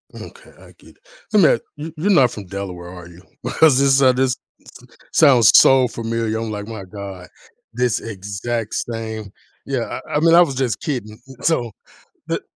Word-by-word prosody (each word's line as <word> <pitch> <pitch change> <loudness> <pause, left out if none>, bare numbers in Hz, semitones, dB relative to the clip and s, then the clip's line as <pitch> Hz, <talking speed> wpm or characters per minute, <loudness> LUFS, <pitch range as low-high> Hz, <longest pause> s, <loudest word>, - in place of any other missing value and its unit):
Okay, 475 +1 -12
I - - -16
get - - -19
it. - - -32 0.3
I 215 - +4
mean, 180 - +5 0.2
you 155 +2 -8
you're 190 +7 +1
not 130 - +4
from 105 -3 -8
Delaware, 90 -2 -7
are 90 -2 -11
you? 85 +1 -16 0.2
Because 130 +2 +3
this 135 -2 +4
this 130 0 0 0.8
sounds 130 -8 +6
so 130 -1 +6
familiar. 115 -1 -3
I'm, 115 -1 -4
like, 105 -1 -5
"My 110 -4 -8
god, 95 -3 -9 0.5
this 125 -2 0
exact 105 +2 -5
same" 110 -3 -5 0.4
yeah, - - -3
I - - -6
I - - +2
mean, 165 +1 +4
I 175 - +8
was 145 -6 +2
just 125 -5 -2
kidding. 110 -7 -5 0.2
So 120 -9 0 0.6
the - - -2
115 Hz, 170 wpm, -20 LUFS, 105-135 Hz, 0.8 s, I